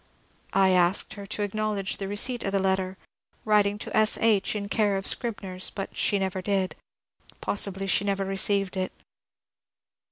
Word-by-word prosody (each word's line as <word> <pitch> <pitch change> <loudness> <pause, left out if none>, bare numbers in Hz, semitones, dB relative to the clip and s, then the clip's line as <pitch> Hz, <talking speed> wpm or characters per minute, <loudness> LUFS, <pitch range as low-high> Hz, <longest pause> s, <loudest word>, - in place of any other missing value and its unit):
I 190 -1 +5
asked 180 +1 +2
her 200 -1 -9
to 210 +1 -2
acknowledge 205 -1 -1
the 195 - -4
re 205 - -4
ceipt 245 +3 +2
of 195 - -1
the 195 - +2
letter, 190 0 0 0.5
writing 205 -1 +3
to - - -6
S. 215 0 +4
H., 215 -2 +2
care 205 -3 +2
of 195 - -5
Scribners, 195 -6 -2
but 195 -1 -6
she 205 - +2
never 190 -1 -2
did. 190 -1 -1 0.6
Possibly 195 -1 +1
she 195 +1 +2
never 195 -1 -1
received 195 0 +1
it. 185 0 -2
195 Hz, 160 wpm, -26 LUFS, 190-205 Hz, 0.6 s, I